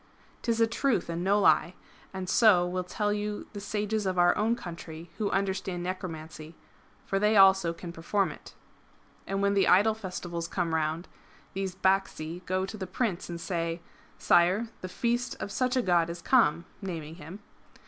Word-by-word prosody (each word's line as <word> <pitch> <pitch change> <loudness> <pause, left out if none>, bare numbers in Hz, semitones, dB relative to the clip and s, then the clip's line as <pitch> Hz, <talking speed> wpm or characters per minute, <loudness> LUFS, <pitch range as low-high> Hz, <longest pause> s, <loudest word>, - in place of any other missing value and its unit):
'Tis 230 -1 0
a 230 - +6
truth 230 -5 0
and 170 +1 -3
no 200 +2 +3
lie! 185 -2 +3 0.4
and 190 -1 -5
so 185 -4 +5
will 180 +1 -2
tell 205 +3 -1
you 210 0 -3
the 205 - -6
sages 210 0 -2
of 185 -1 -1
our 175 0 +5
own 225 +3 +1
country 165 -4 -9
who 210 -2 0
understand 190 -2 -2
necromancy, 160 -3 -6 0.5
for 195 - 0
they 210 +1 +3
also 190 -3 +6
can 170 +1 -8
perform 190 +4 0
it." - - -13 0.7
And 195 0 -1
when 200 0 +3
the 200 -1 +3
Idol 210 +4 +5
Festivals 180 -5 -5
come 170 -3 -2
round, 160 +2 -1 0.5
these 190 -1 -3
Bacsi 185 -3 0
go 185 +1 0
to 205 +3 -7
the 190 -2 -5
Prince 190 -2 -2
and 170 -1 -5
say: 170 -1 -2 0.2
" - - -29
Sire, 185 +7 +4
the 185 - -5
Feast 240 +5 -1
of 200 - -5
such 255 +3 0
a 255 - +2
god 175 -3 +2
is 170 0 -7
come 170 - +3
" - - -31
(naming 165 -4 -6
him). 180 +4 -10
185 Hz, 180 wpm, -28 LUFS, 170-205 Hz, 0.7 s, a